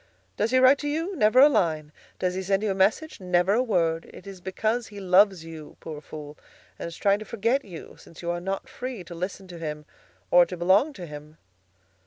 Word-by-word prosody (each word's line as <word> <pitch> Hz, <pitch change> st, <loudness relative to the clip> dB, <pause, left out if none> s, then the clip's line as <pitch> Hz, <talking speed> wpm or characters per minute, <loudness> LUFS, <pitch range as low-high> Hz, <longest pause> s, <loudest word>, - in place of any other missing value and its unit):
Does 215 Hz, -, 0 dB
he 255 Hz, -, +3 dB
write 260 Hz, +2 st, +6 dB
to 290 Hz, -, -3 dB
you? 325 Hz, +6 st, -2 dB
Never 220 Hz, -2 st, +4 dB
a 285 Hz, -, +10 dB
line. 155 Hz, -, 0 dB, 0.3 s
Does 180 Hz, -1 st, -1 dB
he 190 Hz, -, -3 dB
send 195 Hz, +2 st, 0 dB
you 210 Hz, -, +1 dB
a -, -, +1 dB
message? 205 Hz, +12 st, +1 dB
Never 180 Hz, +1 st, +2 dB
a 235 Hz, -, +3 dB
word. 165 Hz, -8 st, 0 dB
It -, -, -13 dB
is 195 Hz, -2 st, -10 dB
because 220 Hz, +6 st, -1 dB
he 205 Hz, -1 st, -10 dB
loves 190 Hz, -2 st, +4 dB
you, 160 Hz, -2 st, -10 dB
poor 155 Hz, -2 st, -8 dB
fool, 150 Hz, -1 st, -10 dB, 0.4 s
and -, -, -4 dB
is 170 Hz, -, -9 dB
trying 200 Hz, 0 st, +2 dB
to -, -, -6 dB
forget 230 Hz, +6 st, 0 dB
you, 175 Hz, -5 st, -11 dB
since 165 Hz, -, -14 dB
you 170 Hz, -, -1 dB
are 175 Hz, 0 st, -3 dB
not 195 Hz, +7 st, -4 dB
free 255 Hz, -5 st, -6 dB
to 175 Hz, -, -10 dB
listen 185 Hz, +3 st, -5 dB
to 175 Hz, -2 st, -9 dB
him 150 Hz, -2 st, -5 dB, 0.5 s
or 175 Hz, 0 st, +8 dB
to 180 Hz, -, -6 dB
belong 190 Hz, -, +3 dB
to 180 Hz, -8 st, -8 dB
him." 150 Hz, 0 st, -11 dB
190 Hz, 225 wpm, -26 LUFS, 170-220 Hz, 0.5 s, a